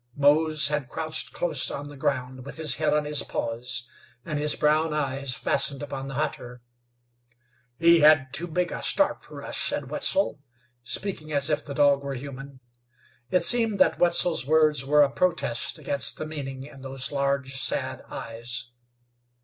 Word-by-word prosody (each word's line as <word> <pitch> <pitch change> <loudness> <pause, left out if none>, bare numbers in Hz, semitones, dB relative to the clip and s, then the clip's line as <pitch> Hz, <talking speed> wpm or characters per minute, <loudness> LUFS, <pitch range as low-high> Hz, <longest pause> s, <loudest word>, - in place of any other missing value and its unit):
Mose 150 +1 +3
had 150 -4 -2
crouched 155 -1 -2
close 160 -6 +1
on 145 +1 -6
the 145 - -11
ground 130 -2 -3
with 140 - -9
his 150 -5 +2
head 155 +1 +1
on 150 0 +1
his 150 -1 +1
paws, 120 +1 -4 0.4
and 155 -3 -3
his 150 0 +1
brown 155 +1 +1
eyes 135 -3 -2
fastened 140 +4 +1
upon 135 -1 -6
the 135 - -7
hunter. 125 -5 -4 1.1
"He 170 +2 +5
had 150 -4 +5
too 175 +4 +1
big 175 +1 -2
a - - -5
start 295 - +1
fer - - -11
us," - - -5
said - - -2
Wetzel, 285 - +1 0.4
speaking 155 +5 -5
as 140 +1 +3
if 150 0 0
the 140 - -8
dog 140 -1 +3
were 140 -1 -4
human. 135 0 -9 0.7
It 180 -2 +3
seemed 225 +2 +5
that 185 - +3
Wetzel's 175 -2 +4
words 155 -3 +3
were 150 +2 +4
a 140 - 0
protest 165 -9 -1
against 140 -2 +2
the - - -5
meaning 135 -4 -6
in 140 -2 -14
those 135 -1 -3
large, 140 -1 -1
sad 135 - -2
eyes. 120 +2 -6
145 Hz, 165 wpm, -25 LUFS, 135-155 Hz, 1.1 s, He